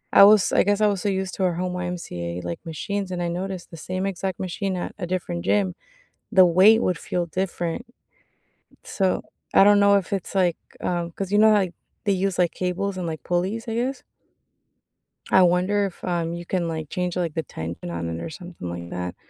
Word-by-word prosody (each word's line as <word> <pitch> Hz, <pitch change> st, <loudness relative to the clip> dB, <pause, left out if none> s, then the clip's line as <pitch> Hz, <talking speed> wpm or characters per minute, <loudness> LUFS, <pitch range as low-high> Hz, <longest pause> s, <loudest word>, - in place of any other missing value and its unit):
I -, -, +10 dB
was 210 Hz, -1 st, +6 dB
I -, -, +4 dB
guess 205 Hz, +1 st, +2 dB
I 215 Hz, -, +4 dB
was 200 Hz, -3 st, +1 dB
so 205 Hz, -, 0 dB
used 190 Hz, -1 st, -2 dB
to 190 Hz, -, -2 dB
our 180 Hz, -2 st, +2 dB
home 180 Hz, +1 st, -2 dB
YMCA, 130 Hz, -, -4 dB
like, 85 Hz, -1 st, -4 dB
machines, 195 Hz, +4 st, -3 dB
and 180 Hz, -1 st, -3 dB
I 175 Hz, -, 0 dB
noticed 180 Hz, +1 st, -4 dB
the 165 Hz, -, -9 dB
same 185 Hz, +4 st, -3 dB
exact 190 Hz, -1 st, -3 dB
machine 190 Hz, +1 st, -2 dB
at 175 Hz, -, -4 dB
a 175 Hz, -, -4 dB
different 175 Hz, -1 st, -3 dB
gym. 190 Hz, -4 st, +2 dB, 0.6 s
The 190 Hz, -4 st, +7 dB
weight 190 Hz, +6 st, +6 dB
would 180 Hz, -6 st, +1 dB
feel 175 Hz, -1 st, -2 dB
different. 175 Hz, +4 st, -3 dB, 1.0 s
So, 190 Hz, -2 st, 0 dB, 0.3 s
I -, -, +7 dB
don't 205 Hz, 0 st, +6 dB
know 200 Hz, 0 st, +6 dB
if 200 Hz, -1 st, 0 dB
it's 195 Hz, 0 st, -3 dB
like, 180 Hz, -3 st, +2 dB, 0.2 s
um 175 Hz, -1 st, -1 dB
'cause, 195 Hz, +3 st, -5 dB
you 205 Hz, -, +3 dB
know, 220 Hz, 0 st, +7 dB
like, 190 Hz, -4 st, +1 dB, 0.3 s
they 205 Hz, -, +3 dB
use, 190 Hz, 0 st, 0 dB
like, 175 Hz, -2 st, +3 dB
cables 185 Hz, +2 st, -2 dB
and, 180 Hz, -2 st, -3 dB
like, 160 Hz, -1 st, -5 dB
pulleys, 190 Hz, +7 st, -1 dB
I 225 Hz, -, -2 dB
guess? 250 Hz, +3 st, -2 dB, 1.3 s
I 190 Hz, -, +7 dB
wonder 185 Hz, +3 st, +3 dB
if, 180 Hz, -, -13 dB
um, 170 Hz, -2 st, -1 dB
you 175 Hz, 0 st, -6 dB
can, 175 Hz, -1 st, -1 dB
like, 160 Hz, -2 st, -4 dB
change, 180 Hz, -1 st, -2 dB
like, 175 Hz, -4 st, -1 dB
the 160 Hz, -, -1 dB
tension 85 Hz, -, -6 dB
on 85 Hz, -1 st, -3 dB
it 85 Hz, 0 st, -4 dB
or -, -, -5 dB
something 170 Hz, -, -9 dB
like 85 Hz, 0 st, -6 dB
that. 90 Hz, 0 st, -4 dB
180 Hz, 210 wpm, -24 LUFS, 170-195 Hz, 1.3 s, I